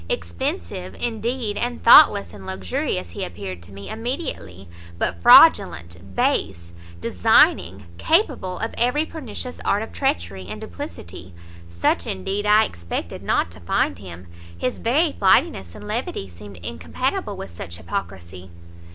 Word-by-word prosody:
expensive, 85 +2 -4
indeed, 230 -1 -2
and 240 +1 -3
thoughtless 230 - +7
and 100 -2 -11
luxurious 90 -1 -3
he - - -5
appeared 90 +1 -7
to 85 +3 -15
me 100 +1 -10
immediately; 225 - -5 0.3
but 85 0 -2
fraudulent, 85 +2 +5
base, 85 -2 -1 0.3
designing, 90 +2 +3
capable 280 - +1
of 225 - -4
every 250 +6 +2
pernicious 250 -6 -7
art 205 +2 +1
of 225 - -10
treachery 90 +2 -2
and 105 +2 -6
duplicity, 85 +1 -9 0.3
such, 85 0 0
indeed, 195 - -3
I 215 +1 +6
expected 85 - -6
not 85 - 0
to 85 - -12
find 85 +1 -1
him, 90 -2 -10 0.3
his 125 +9 -2
very 295 +8 +2
flightiness 95 - +2
and - - -10
levity 95 - -3
seemed 95 +2 -12
incompatible 80 0 -3
with - - -8
such 85 0 -7
hypocrisy." 90 +2 -6
95 Hz, 135 wpm, -22 LUFS, -, 0.3 s, thoughtless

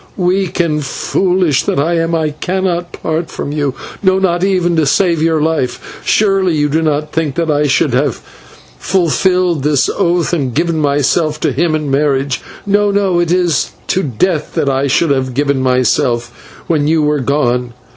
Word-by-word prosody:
weak 185 0 0
and 155 -3 0
foolish 180 +2 0
that - - -2
I 160 +4 +1
am, 165 0 0
I 155 -2 0
cannot 175 +2 -2
part 160 +1 -3
from 145 - -5
you, 145 -3 -2 0.3
no, 190 -1 +3
not 180 -2 0
even 180 -3 +1
to 155 -3 +2
save 170 +1 +2
your 160 -1 +2
life. 155 -4 -2
Surely 195 -5 +2
you 150 -1 +1
did 160 +2 0
not 150 0 -1
think 155 -4 -2
that 165 -2 0
I 150 0 +1
should 135 0 +1
have 135 +4 +1 0.6
fulfilled 180 -2 +1
this 140 -2 +1
oath 175 0 0
and 135 -8 -1
given 165 +1 0
myself 150 +2 +1
to - - +1
him 160 +2 0
in 150 -3 -3
marriage. 135 -2 0 0.2
No, 205 0 +2
no 195 -3 +1
it 170 -1 0
is 175 -5 +1 0.2
to 190 - +1
death 155 - -1
that 140 - +1
I 135 +1 0
should 145 +3 +2
have 130 -2 -1
given 140 -1 +1
myself 125 -1 -1
when 150 -3 +1
you 160 0 +2
were 150 0 +1
gone. 125 -3 0
155 Hz, 175 wpm, -14 LUFS, 140-175 Hz, 0.6 s, no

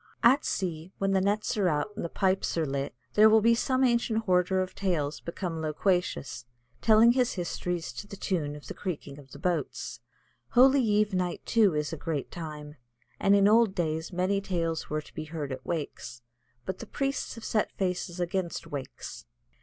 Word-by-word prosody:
At 260 +5 +6
sea, 170 -2 -3
when 195 0 0
the 190 -1 +3
nets 205 +2 0
are 200 -3 +3
out 155 +7 -1
and - - -4
the 170 - -3
pipes 190 -1 0
are 160 - +2
lit, 140 -1 -3 0.2
then 215 +1 +7
will 220 +1 +5
some 260 +2 +1
ancient 235 -2 +2
hoarder 185 -1 +2
of 185 0 -2
tales 160 -7 -1
become 170 -1 -4
loquacious, 160 -4 -1 0.4
telling 225 +1 +6
his 250 -1 +2
histories 175 -1 -3
to 205 - -7
the 200 - -8
tune 155 -7 -2
of 150 - -11
the - - -6
creaking 145 -6 -5
of 135 -2 -15
the 145 - -11
boats. 175 +2 -2 0.5
Holy 265 +2 +6
eve 210 -2 +2
night, 180 -1 -1
too, 210 -8 +4
is 150 +1 -1
a - - -3
great 150 -3 -3
time, 150 -3 -7 0.4
and 200 +1 +4
in 200 0 +5
old 220 -2 +4
days 160 -1 -1
many 185 +2 +1
tales 165 -4 -2
were 155 0 -1
to - - -17
be - - -5
heard 150 -3 -5
at 130 0 -5
wakes. 145 -7 -4 0.4
But 190 - -4
the - - -8
priests 275 -3 -2
have 230 - -9
set 215 - 0
faces 180 -1 -2
against 175 -1 -2
wakes. 130 - -7
180 Hz, 185 wpm, -28 LUFS, 155-205 Hz, 0.5 s, then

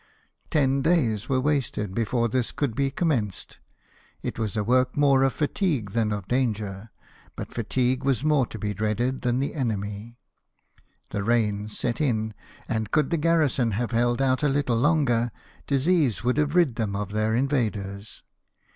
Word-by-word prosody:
Ten 135 -2 +2
days 125 - +1
were 130 -1 +2
wasted 130 -8 -1
before 115 +2 0
this 120 +1 -1
could 140 -6 -2
be 135 +3 0
commenced: 130 - -2 0.6
it - - -4
was 110 -2 -2
a 105 - +1
work 125 +4 +2
more 140 -2 +4
of 135 0 +3
fatigue 150 - -1
than 110 0 0
of 100 -2 -4
danger; 110 -4 -1 0.5
but - - -7
fatigue 130 +1 0
was 135 -1 +1
more 150 -5 +3
to - - -8
be 105 -1 -2
dreaded 110 +5 -1
than 120 -1 +1
the 140 +2 -1
enemy. 110 -3 -3 0.9
The 100 - -2
rains 105 -2 0
set 120 +4 -1
in; 110 -6 0 0.3
and 110 -2 -2
could 150 +2 +1
the 170 - +2
garrison 150 -8 +2
have 120 +4 -2
held 120 +2 +1
out 130 0 +2
a 150 - +2
little 135 -4 +1
longer, 120 -4 +2 0.4
disease 140 - +2
would 125 +3 +1
have 150 +1 +1
rid 165 -10 +3
them 105 -4 -1
of 100 0 -3
their 110 +1 0
invaders. 110 -6 -2
120 Hz, 165 wpm, -25 LUFS, 110-140 Hz, 0.9 s, more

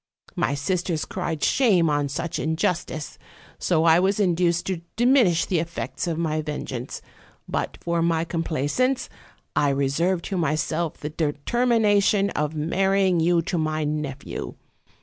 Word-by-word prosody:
My 140 - 0
sisters 170 +2 -1
cried 165 -5 -4
shame 200 -11 +4
on 145 -2 +1
such 155 +4 -3
injustice, 160 -1 -2 0.4
so 160 -3 +2
I 165 0 +6
was 195 +3 +1
in 185 -4 +3
duced 170 0 +1
to 185 -3 -2
diminish 240 -8 +4
the 180 - 0
effects 160 -4 -4
of 165 -2 -1
my 155 -2 0
vengeance; 135 -4 -5 0.4
but - - -3
for 170 -1 0
my 165 -1 +1
complaisance, 165 - -1 0.5
I 145 - +3
reserved 140 +7 0
to 195 - -3
myself 155 +1 -1
the 150 - -6
determination 200 - +2
of 150 +1 -2
marrying 190 +3 +2
you 170 +1 +3
to 175 +1 -2
my 155 0 -1
nephew. 150 -2 -4
165 Hz, 140 wpm, -24 LUFS, 150-185 Hz, 0.5 s, I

